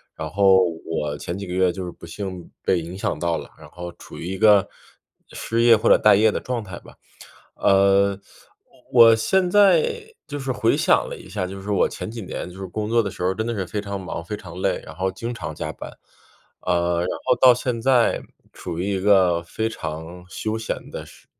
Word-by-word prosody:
然 80 - -5
后 95 +1 +5 0.2
我 75 -3 -2
前 85 +5 -5
几 100 - -6
个 90 - -5
月 90 -1 +3
就 95 0 -6
是 90 - -6
不 - - -22
幸 95 0 -7
被 90 - +2
影 85 +3 -7
响 80 - -2
到 85 0 0
了， - - -8
然 - - -13
后 90 0 -7
处 - - -11
于 - - -7
一 95 +1 -4
个 105 -2 +5 0.6
失 115 +1 -2
业 115 -1 +7
或 110 - -1
者 - - +8
待 105 - +5
业 110 +2 +4
的 - - -2
状 125 -2 -3
态 95 -4 -9
吧。 - - -16 0.6
呃， 100 0 +3 0.7
我 115 -2 +8
现 180 +10 +1
在 450 - +3
就 145 -2 -5
是 135 -1 -4
回 115 -2 +2
想 - - +3
了 - - -6
一 - - -13
下， 95 -1 -3
就 95 +1 -8
是 100 - -6
我 100 - +3
前 - - -6
几 115 -1 -7
年 90 - -6
就 90 - -12
是 95 - -5
工 105 +4 -4
作 115 0 +3
的 100 - -3
时 - - -8
候 90 +1 +1
真 110 +3 -3
的 120 - -2
是 95 -4 -3
非 105 +4 -3
常 100 -1 -5
忙、 85 -2 -6
非 95 - -5
常 90 -3 -10
累， - - 0
然 70 - -10
后 95 +1 -1
经 120 +4 -5
常 - - -6
加 - - -5
班。 - - -9 0.7
啊， 85 -1 +1
然 90 - -1 0.2
后 - - +4
到 130 -1 +8
现 120 -1 -3
在 125 -2 +3 0.3
处 85 -2 -6
于 95 +3 -2
一 - - -2
个 95 -4 +4
非 110 +6 -3
常 85 -4 -7
休 110 0 -3
闲 110 - -5
的 - - -7
时 - - -18
100 Hz, 245 characters per minute, -22 LUFS, 90-115 Hz, 0.7 s, 者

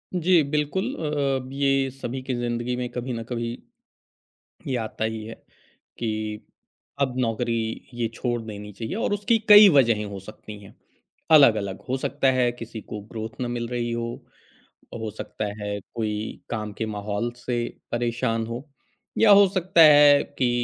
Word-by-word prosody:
जी 175 -1 +4
बिल्कुल 150 +6 -1
अ, - - -10 0.5
ब - - -10
ये 135 -1 +1
सभी 130 0 -6
की 130 - -1
ज़िंदगी 120 0 -2
में 125 0 -3
कभी 125 +1 -4
ना 115 -1 -4
कभी 115 0 -4 1.2
ये 135 - -2
आता 115 0 -3
ही 110 -1 -3
है 115 - -7 0.6
कि 115 - -2 0.9
अब 130 -3 +1
नौकरी 115 0 0 0.4
ये 120 -1 -1
छोड़ 120 0 -2
देनी 105 -1 -8
चाहिए 110 - -5
और 225 - -1
उसकी 205 +3 +2
कई 210 0 +10
वजहें 115 -5 +4
हो 100 -1 -7
सकती 105 +1 -11
हैं 100 - -14 0.6
अलग-अलग। 110 -11 +5
हो 130 - 0
सकता 135 0 +1
है 125 -1 +2
किसी 115 -2 -8
को 105 - -7
ग्रोथ 110 +1 -6
ना 125 - -2
मिल 120 -1 -3
रही 120 -1 -2
हो, 115 0 -4 0.7
हो 110 -2 -5
सकता 105 - -5 0.2
है 105 0 -3 0.2
कोई 110 -1 -3
काम 105 -2 -4
के 110 - -3
माहौल 105 +2 -3
से 125 -1 -2 0.3
परेशान 120 -1 -1
हो 120 +5 -6 0.5
या 220 -2 +6
हो 200 0 +8
सकता 185 -2 +2
है 145 -2 +8 0.2
कि 125 -2 +3
120 Hz, 165 wpm, -24 LUFS, 110-135 Hz, 1.2 s, कई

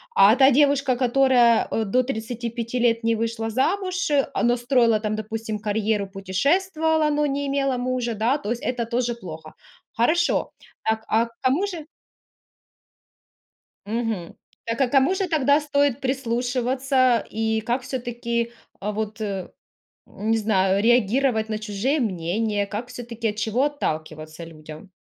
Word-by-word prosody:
А 200 +3 +7
та 270 +1 +6
девушка, 280 -1 +3
которая, 245 -2 +4
э, 225 - 0
до 250 +6 +2
35 235 0 -4
лет 230 -1 +2
не 230 0 +2
вышла 225 0 -2
замуж, 370 - 0 0.2
а, - - -1
но 240 +1 +3
строила 240 -3 +3
там, 215 0 -2
допустим, 220 0 -4
карьеру, 210 -1 -1
путешествовала, 310 - +1
но 295 0 +1
не 285 0 -1
имела 275 -2 0
мужа, 250 -1 -1
да,- 230 +6 +1
то 210 - -6
есть 240 - -3
это 245 -2 -2
тоже 240 0 -1
плохо. 160 -7 -10 0.4
Хорошо. 320 +10 +1 0.4
Так, 220 0 +1
а 225 +2 +2
к 230 - -14
кому 275 +10 +2
же 335 -6 -6 2.0
мгм, 220 -5 -3 0.3
так 230 +3 -3
а 265 - +3
к - - -13
кому 275 +6 +4
же 380 -1 -1
тогда 290 -2 +3
стоит 285 -3 +1
прислушиваться? 255 0 +1
И 220 0 0
как 240 +4 -2
всё-таки 235 -2 -3 0.3
вот, 215 +1 -4
э, 195 -3 -4 0.6
не 225 +2 -1
знаю, 195 -2 +2
реагировать 240 0 +2
на 215 - -1
чужие 215 +8 -1
мнения, 205 0 -1
как 215 +4 -5
всё-таки, 235 -2 -4
от 210 - -5
чего 220 +5 0
отталкиваться 155 - -4
людям? 155 +3 -12
235 Hz, 145 wpm, -23 LUFS, 215-265 Hz, 2.0 s, А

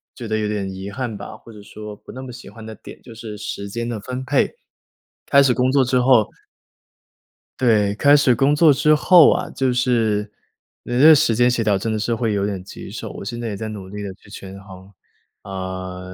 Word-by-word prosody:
觉 120 - -7
得 110 0 -1
有 105 - -1
点 100 -2 -3
遗 95 +1 -7
憾 115 -1 -5
吧， 100 - -9
或 115 - -15
者 105 -1 -13
说 105 0 -10
不 - - -14
那 130 - -8
么 130 -2 -9
喜 120 - -11
欢 110 +1 -12
的 110 0 -8
点 - - -13
就 115 -2 -13
是 110 -2 -8
时 100 -1 -6
间 115 +3 -4
的 115 - -3
分 125 +4 -6
配。 135 +1 +1 0.7
开 140 0 +6
始 130 -2 +3
工 125 +1 +1
作 135 -1 +3
之 125 0 +1
后 125 -4 +4 1.3
对， 105 -5 +2
开 145 +6 +5
始 140 -3 +4
工 135 +5 +2
作 155 0 +5
之 150 +2 +3
后 170 +1 +6
啊， 180 +1 -2
就 130 -2 -1
是 115 -4 0 0.5
你 - - -6
那 120 - +1
个 - - +10
时 120 -6 +3
间 120 +2 +3
协 120 - -1
调 105 -3 +2
真 110 +4 -3
的 110 - -2
是 115 +2 -1
会 115 -1 -1
有 100 -1 0
点 100 -3 -4
棘 95 - -10
手， - - -7
我 - - -9
现 120 +3 -5
在 115 - -3
也 100 - -5
在 110 - -5
努 100 -3 -8
力 105 +1 -7
地 100 -2 -6
去 100 - -21
权 95 -1 -10
衡。 95 -1 -13 0.5
啊， 95 -1 -6
110 Hz, 250 characters per minute, -20 LUFS, 100-125 Hz, 1.3 s, 个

